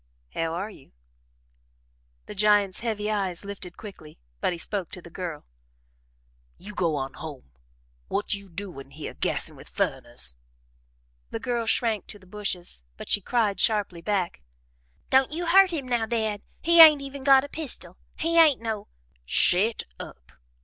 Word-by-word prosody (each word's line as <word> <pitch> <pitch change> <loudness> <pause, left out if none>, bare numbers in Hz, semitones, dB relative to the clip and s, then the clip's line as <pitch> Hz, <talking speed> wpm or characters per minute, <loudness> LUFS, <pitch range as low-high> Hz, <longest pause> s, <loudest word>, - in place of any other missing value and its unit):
"How 165 0 -1
are 200 +5 -4
you?" 135 - -17 1.3
The - - -8
giant's 205 -2 +3
heavy 215 -2 -2
eyes 195 -3 -2
lifted 195 -3 -8
quickly, 190 -8 -11 0.2
but - - +1
he 175 - -4
spoke 190 0 -2
to 185 - -6
the 170 - -12
girl. 170 -4 -6 1.1
"You 205 +3 -8
go 170 -6 0
on 135 -1 -3
home 145 - -9 0.6
what 205 +1 0
you 200 -1 -4
doin' 170 -7 -7
hyeh 150 +2 -7
gassin' - - +3
with - - -13
furriners!" 65 - 0 1.0
The - - -4
girl 235 -2 -2
shrank 225 -3 +1
to 205 - -8
the 195 - -19
bushes, 185 - -4 0.2
but - - -9
she 205 - +3
cried 215 -1 0
sharply 205 -6 +1
back: 185 - -1 0.7
"Don't 265 +1 +4
you 340 +3 -3
hurt 380 +3 +6
him 300 -7 -3
now, 240 -3 0
Dad. 220 -3 -1 0.2
He 340 0 +8
ain't 305 -3 +9
even 275 0 -7
got 270 -1 +7
a - - -5
pistol. 260 - -6 0.2
He 335 +1 +3
ain't 310 -5 +6
no 220 -3 -4 0.2
" - - -38
"Shet 190 - +2 0.2
up!" 65 -2 -10
205 Hz, 160 wpm, -26 LUFS, 175-240 Hz, 1.3 s, ain't